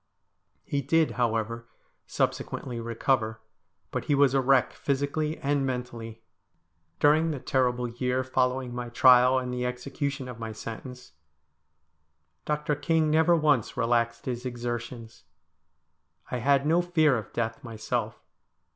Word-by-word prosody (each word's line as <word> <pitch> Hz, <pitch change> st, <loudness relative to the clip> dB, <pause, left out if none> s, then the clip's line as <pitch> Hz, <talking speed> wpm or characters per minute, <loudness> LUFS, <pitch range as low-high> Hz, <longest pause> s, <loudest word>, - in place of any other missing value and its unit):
He 140 Hz, -, -2 dB
did, 160 Hz, +4 st, +2 dB
however, 115 Hz, -1 st, -1 dB, 0.4 s
subsequently 120 Hz, -3 st, -2 dB
recover, 115 Hz, -1 st, -1 dB, 0.5 s
but -, -, -3 dB
he 145 Hz, -, +2 dB
was 140 Hz, -2 st, +4 dB
a 135 Hz, -, +3 dB
wreck, 130 Hz, -1 st, +3 dB
physically 145 Hz, +3 st, -1 dB
and 140 Hz, 0 st, 0 dB
mentally. 120 Hz, -3 st, -5 dB, 0.8 s
During 155 Hz, +3 st, +4 dB
the 150 Hz, -, -2 dB
terrible 125 Hz, -2 st, 0 dB
year 125 Hz, +2 st, -1 dB
following 130 Hz, -1 st, 0 dB
my 120 Hz, 0 st, -5 dB
trial 125 Hz, +1 st, +6 dB
and 125 Hz, -1 st, -2 dB
the 125 Hz, 0 st, -2 dB
execution 135 Hz, +2 st, -3 dB
of 125 Hz, -2 st, -8 dB
my 110 Hz, -1 st, -5 dB
sentence, 125 Hz, +3 st, -8 dB, 1.3 s
Dr. 150 Hz, 0 st, -1 dB
King 155 Hz, +2 st, +1 dB
never 160 Hz, +2 st, +4 dB
once 145 Hz, -6 st, +1 dB
relaxed 115 Hz, -1 st, 0 dB
his 125 Hz, -1 st, -3 dB
exertions. 120 Hz, -2 st, -6 dB, 1.1 s
I 125 Hz, -, -1 dB
had 140 Hz, +3 st, +2 dB
no 165 Hz, +3 st, +3 dB
fear 160 Hz, -5 st, +3 dB
of 110 Hz, -4 st, -5 dB
death 115 Hz, -1 st, -3 dB
myself. 115 Hz, -1 st, -4 dB
125 Hz, 130 wpm, -27 LUFS, 120-140 Hz, 1.3 s, trial